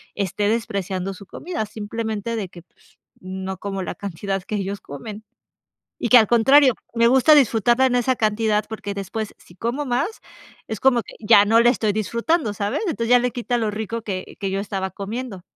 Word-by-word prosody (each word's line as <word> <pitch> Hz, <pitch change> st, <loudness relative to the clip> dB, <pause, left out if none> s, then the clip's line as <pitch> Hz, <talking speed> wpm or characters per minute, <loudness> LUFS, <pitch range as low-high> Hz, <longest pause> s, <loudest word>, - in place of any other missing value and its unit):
esté 200 Hz, +1 st, -1 dB
despreciando 195 Hz, -4 st, -2 dB
su 200 Hz, +1 st, -12 dB
comida, 335 Hz, -, -4 dB
simplemente 220 Hz, +1 st, -4 dB
de 200 Hz, -5 st, -4 dB
que 175 Hz, -, -13 dB
pues, -, -, -29 dB, 0.2 s
no 190 Hz, +1 st, -6 dB
como 195 Hz, 0 st, -4 dB
la -, -, -5 dB
cantidad 195 Hz, 0 st, -4 dB
que 215 Hz, -, -4 dB
ellos 200 Hz, 0 st, -3 dB
comen. 205 Hz, +10 st, -8 dB, 0.8 s
Y 235 Hz, -, -1 dB
que 250 Hz, -, +9 dB
al 220 Hz, -, +3 dB
contrario, 255 Hz, +3 st, +5 dB, 0.2 s
me 235 Hz, 0 st, +4 dB
gusta 265 Hz, +5 st, +6 dB
disfrutarla 240 Hz, -2 st, +4 dB
en 250 Hz, -, 0 dB
esa 245 Hz, +1 st, +2 dB
cantidad, 215 Hz, -1 st, +1 dB
porque 210 Hz, -2 st, -5 dB
después, 200 Hz, +2 st, -5 dB
si 175 Hz, -, -19 dB
como 240 Hz, +9 st, -2 dB
más, 275 Hz, -, -2 dB, 0.5 s
es 220 Hz, -, -5 dB
como 255 Hz, -3 st, +4 dB
que -, -, -13 dB
ya 210 Hz, -2 st, +6 dB
no 225 Hz, +2 st, +4 dB
la 235 Hz, +1 st, +6 dB
estoy 220 Hz, -3 st, 0 dB
disfrutando, 230 Hz, -, 0 dB
¿sabes? 205 Hz, -, -2 dB
Entonces 235 Hz, -8 st, -2 dB
ya 245 Hz, -, +7 dB
le 245 Hz, 0 st, 0 dB
quita 245 Hz, 0 st, -2 dB
lo 220 Hz, -3 st, -1 dB
rico 220 Hz, +2 st, -4 dB
que 190 Hz, -4 st, -6 dB
que 195 Hz, -1 st, -2 dB
yo 195 Hz, -, -1 dB
estaba 195 Hz, -2 st, -3 dB
comiendo. 205 Hz, 0 st, -6 dB
220 Hz, 195 wpm, -22 LUFS, 200-235 Hz, 0.8 s, que